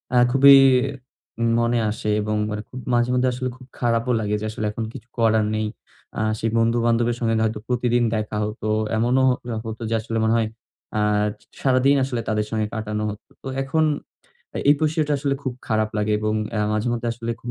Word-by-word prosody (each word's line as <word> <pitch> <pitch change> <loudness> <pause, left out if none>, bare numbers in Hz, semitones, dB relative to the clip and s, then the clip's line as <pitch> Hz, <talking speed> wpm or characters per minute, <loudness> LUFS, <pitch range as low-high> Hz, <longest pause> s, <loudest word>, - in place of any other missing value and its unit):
আ - - +5
খুবই 140 +1 +8 1.0
মনে 120 0 +2
আসে 105 0 -4
এবং 105 0 -1 0.2
এরকম 105 +5 -7
মাঝে 120 +1 +2
মধ্যে 125 0 +2
আসলে 130 +1 -3
খুব 130 - -14
খারাপও 120 +1 +1
লাগে 105 0 -1
যে, 110 - -3
আসলে 110 0 -4
এখন 115 +1 -4
কিছু - - -10
করার 110 -2 +3
নেই। 110 0 -1 0.5
আ - - 0 0.2
সেই 115 - 0
বন্ধু-বান্ধবের 115 +1 +2
সঙ্গে 115 -2 +1
এমন 110 - +2
হয়তো 110 -1 -2
প্রতিদিন 120 -1 +1
দেখা 105 0 -3
হত। 105 +1 -5 0.3
এমনও 125 +4 +2
হ - - +4 0.3
হতো 110 +1 -6
যে, 115 - +1
আসলে 115 0 -3
মনে 110 +1 +3
হয় 115 - +1 0.5
আ - - +2 0.6
সারাদিন 135 +1 +4
আসলে 125 -3 -2
তাদের 105 -1 0
সঙ্গে 110 -1 0
কাটানো 105 -1 -3
হতো। 105 +1 -9
তো - - -6 0.2
এখন 155 +4 +1 0.9
এই - - +7
বিষয়টা 155 -1 +1
আসলে 140 0 0
খুব 130 -2 -2 0.2
খারাপ 110 -1 +1
লাগে 105 0 0
এবং 110 0 0 0.2
আ - - +1
মাঝে, 110 +3 0
মাঝে, 120 0 -3
আসলে 115 0 -5
খুব 120 - -6
115 Hz, 190 wpm, -23 LUFS, 110-125 Hz, 1.0 s, খুবই